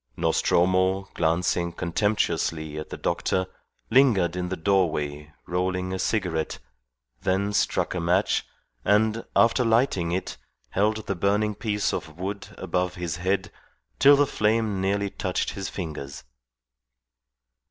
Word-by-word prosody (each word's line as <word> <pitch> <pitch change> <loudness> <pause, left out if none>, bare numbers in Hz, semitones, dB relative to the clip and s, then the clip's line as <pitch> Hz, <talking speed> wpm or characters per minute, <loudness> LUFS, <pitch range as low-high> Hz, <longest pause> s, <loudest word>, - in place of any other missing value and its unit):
Nostromo, 95 +2 +2
glancing 85 +1 +1
contemptuously 85 -4 -1
at 75 - -7
the - - -6
doctor, 95 0 0 0.5
lingered 110 -10 +4
in 90 0 -2
the 95 - -3
doorway 75 -6 0
rolling 90 +1 -1
a 95 - -3
cigarette, 90 -6 -1 0.6
then 100 +2 0
struck 105 - +1
a 90 - -2
match, 90 +4 +2 0.4
and, 110 +2 +2
after 115 +2 +4
lighting 115 -7 +2
it, 95 +2 -3 0.3
held 110 +2 +1
the - - -1
burning 105 +3 +1
piece 105 -1 -1
of 80 -1 -5
wood 100 +3 -4
above 90 0 -1
his 85 -1 -3
head 95 +3 -1 0.5
till 140 +2 +8
the 145 +1 +4
flame 105 -4 0
nearly 100 +1 0
touched 90 -1 -2
his 95 -1 -5
fingers. 75 -6 -6
95 Hz, 125 wpm, -25 LUFS, 85-105 Hz, 0.6 s, till